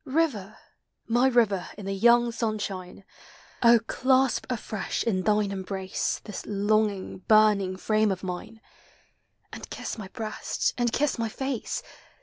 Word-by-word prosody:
River! 260 - -1 0.5
my 240 +3 +3
river 220 -7 +2
in 205 - -8
the 195 - -2
young 235 +4 +4
sunshine! 205 -5 -4 0.6
Oh, 235 0 +7
clasp 260 +1 +2
afresh 215 -4 -3
in 195 -5 0
thine 210 0 +1
embrace 190 -1 -3
This 210 - -7
longing, 205 -1 0
burning 210 -3 +4
frame 215 +1 +2
of 190 0 -4
mine, 190 +5 -6 0.9
And - - -8
kiss - - -5
my 200 - -6
breast, 215 +1 -2
and 240 -1 0
kiss 285 -1 0
my 225 -1 -1
face! 265 0 -3
215 Hz, 135 wpm, -27 LUFS, 195-235 Hz, 0.9 s, Oh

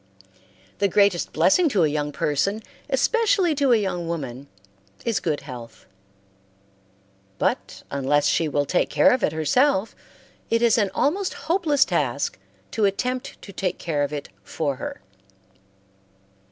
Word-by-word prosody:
The 200 - +3
greatest 200 -2 +2
blessing 195 - +3
to 200 -9 +2
a - - +4
young 150 0 -2
person, 195 +11 -1 0.3
especially 455 -7 +2
to 280 -3 +2
a 235 - +6
young 180 -5 -2
woman, 140 -5 -5 0.6
is 225 -6 +1
good 160 -4 -2
health; 120 -4 -10 1.5
but - - -2
unless 140 +1 +1
she 160 +2 +2
will 145 -1 0
take 180 - +1
care - - +5
of 255 - +1
it - - +2
herself, 190 - +1 0.5
it 230 +1 +2
is 235 -1 +4
an 205 -2 +2
almost 375 +6 0
hopeless 320 -4 +3
task 475 +1 -1 0.3
to 220 -3 +1
attempt 250 +6 -2
to 200 - -10
take 185 -1 -2
care 155 -4 -2
of 145 - 0
it 145 -1 -5
for 140 +7 -3
her. - - -6
190 Hz, 140 wpm, -23 LUFS, -, 1.5 s, a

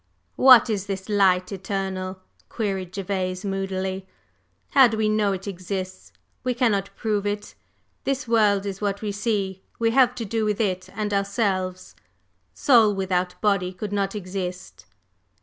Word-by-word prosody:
"What 255 -3 +8
is 205 -3 -2
the 195 -1 -2
Light 190 -3 +3
Eternal?" 190 -1 -4 0.3
queried 195 -5 -3
Gervase, 185 -1 -3
moodily. 190 -1 -3 0.6
"How 270 -3 +7
do 220 -1 -3
we 215 0 +1
know 215 -1 +2
it 195 +1 -5
exists? 185 0 -5 0.3
We 250 -1 0
cannot 210 -6 +1
prove 210 -2 -1
it. 205 0 -4 0.5
This 270 -2 -2
world 210 -3 +3
is 195 0 -5
what 200 0 -2
we 210 - -1
see; 200 -3 -2 0.2
we 230 -1 +2
have 250 0 +4
to 235 - -4
do 225 +2 -1
with 210 -1 0
it 185 -4 -1
and 210 0 -2
ourselves. 195 -2 -1 0.6
Soul 225 -7 +5
without 180 -1 -1
body 195 -4 +1
could 205 +2 -6
not 200 0 -1
exist. 180 - -6
200 Hz, 150 wpm, -24 LUFS, 185-215 Hz, 0.6 s, What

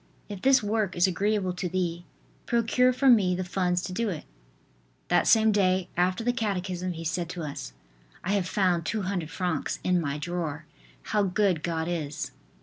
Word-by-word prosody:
if 200 -2 -7
this 265 -3 +5
work 205 -2 0
is 175 - +4
agreeable 195 0 0
to 180 0 -3
thee, 175 -1 -2 0.4
procure 240 +2 +3
for 265 +2 +1
me 200 -8 +5
the 185 - -2
funds 180 -1 0
to - - -4
do 230 +3 0
it. 170 -5 -5 0.8
That - - +3
same 220 -1 +5
day, 185 -3 +2
after 185 +4 +1
the 245 +1 +1
catechism, 185 -5 -2
he 165 0 -7
said 165 +1 -2
to 175 -1 -5
us: 140 - -6 0.5
"I 185 - -1
have 200 -3 +1
found 180 -4 +2
200 185 -4 -2
francs 180 +1 -2
in 180 -1 +2
my 140 -2 -2
drawer. 160 -1 -4 0.4
How 210 - +1
good 190 -3 +1
God 160 -1 -2
is!" 155 -4 -3
185 Hz, 175 wpm, -27 LUFS, 170-205 Hz, 0.8 s, this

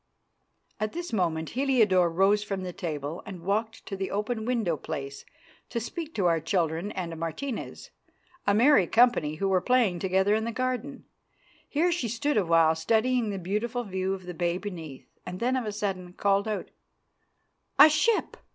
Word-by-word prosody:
At 215 0 -2
this 345 -6 -5
moment 165 -5 0
Heliodore 225 -9 +3
rose 195 +5 +3
from 195 -2 -4
the 180 -1 -5
table 155 -1 -4
and 180 -4 -9
walked 220 +4 -2
to 195 - -5
the 190 0 -3
open 220 +2 -2
window 225 -10 +1
place 140 -3 -6 0.4
to 235 - -2
speak 315 +8 -6
to 195 - 0
our 165 -2 +3
children 165 +3 -1
and 170 -3 -4
Martina's, 210 - -5 0.6
a 200 - +4
merry 235 - +5
company 225 -11 +3
who 195 +5 -1
were 190 -1 +2
playing 235 -8 +2
together 190 +2 +2
in 220 +1 +1
the 230 - -2
garden. 255 +3 -3 0.6
Here 335 +5 +2
she 335 -8 -1
stood 235 +6 -1
a 205 - +4
while 165 -1 +5
studying 225 +7 +1
the 200 - -3
beautiful 215 +7 -2
view 190 -2 -2
of 185 -2 -11
the 180 - -6
bay 175 +1 -1
beneath; 165 -9 -8 0.2
then 235 +8 -1
of 255 -3 -1
a 210 - -2
sudden 190 -4 -4
called 200 +2 +1
out, 215 -1 -3 1.1
"A - - +10
ship! 415 +9 +1
200 Hz, 170 wpm, -27 LUFS, 175-235 Hz, 1.1 s, A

